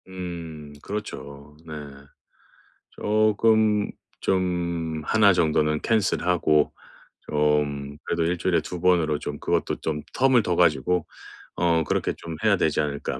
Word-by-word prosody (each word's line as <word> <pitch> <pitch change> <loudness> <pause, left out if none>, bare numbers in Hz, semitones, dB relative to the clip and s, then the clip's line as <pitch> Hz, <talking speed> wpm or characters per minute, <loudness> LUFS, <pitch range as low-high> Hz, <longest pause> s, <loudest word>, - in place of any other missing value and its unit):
음 85 -5 -7
그렇죠. 75 -8 -7
네. 80 - -8 1.2
쪼끔 110 0 +2 0.3
좀 85 -4 -1
하나 105 +3 +5
정도는 75 -3 +1
캔슬하고 90 -7 +2 0.5
좀 75 -1 0
그래도 85 - -1
1주일에 85 +1 +1
2번으로 85 -4 +1
좀 75 -1 -6
그것도 - - 0
좀 75 -1 -3
텀을 130 -3 +4
둬 90 - 0
가지고 85 0 +2 0.5
어 85 -2 +2
그렇게 - - -1
좀 85 -1 -7
해야 105 -3 +4
되지 80 -3 +1
않을까. 70 -1 -3
85 Hz, 225 characters per minute, -24 LUFS, 75-95 Hz, 1.2 s, 하나